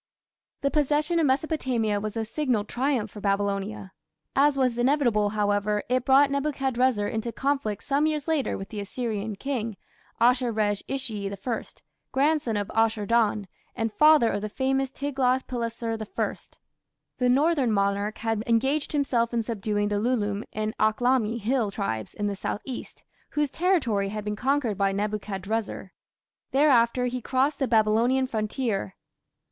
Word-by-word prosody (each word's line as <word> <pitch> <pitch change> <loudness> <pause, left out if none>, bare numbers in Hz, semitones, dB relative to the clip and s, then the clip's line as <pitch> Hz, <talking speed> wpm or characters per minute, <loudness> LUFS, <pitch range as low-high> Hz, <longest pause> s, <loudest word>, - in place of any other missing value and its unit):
The 280 - +1
possession 300 +3 +1
of 315 - +3
Mesopotamia 260 -7 0
was 215 +2 -4
a 225 - -1
signal 250 -3 0
triumph 245 -2 -1
for 210 - -9
Babylonia. 200 0 -1 0.4
As 280 +1 +4
was 255 -3 +2
inevitable, 240 -6 +2
however, 205 0 0
it 255 0 +1
brought 275 +1 +5
Nebuchadrezzar 265 -6 +1
into 225 +2 -3
conflict 270 -6 -1
some 285 +2 +2
years 305 -1 -2
later 315 -4 0
with 195 - -7
the 215 - -6
Assyrian 215 0 -3
king, 230 -4 -3 0.4
Ashur 245 +1 +3
resh 210 -2 0
ishi 220 -7 -2
I, 210 +4 -3 0.5
grandson 280 -5 +1
of 205 -1 -3
Ashur 225 -1 +2
dan, 215 -3 +2 0.3
and 225 -2 -2
father 300 -2 +6
of 205 - -2
the 215 - -3
famous 270 +3 0
Tiglath 265 -2 0
pileser 230 -2 -3
I. 215 - -2 0.9
The 250 -1 +3
northern 275 -1 +3
monarch 200 +1 0
had 225 -1 -1
engaged 265 +7 +1
himself 245 -5 +1
in 230 - +1
subduing 210 -2 -1
the 205 -1 0
Lullume 210 -3 0
and 215 0 -3
Akhlami 235 +1 +2
hill 230 0 0
tribes 195 - -4
in 205 - -2
the 205 -1 -1
south 200 - -3
east, 260 -3 -7 0.3
whose 295 -2 -1
territory 265 - +1
had 210 0 -5
been 210 0 -2
conquered 250 -3 0
by 195 0 +2
Nebuchadrezzar. 205 0 -3 0.6
Thereafter 250 -3 +3
he 250 0 -2
crossed 270 +4 0
the 270 - +1
Babylonian 230 +4 +3
frontier. 215 - -2
230 Hz, 150 wpm, -26 LUFS, 210-270 Hz, 0.9 s, father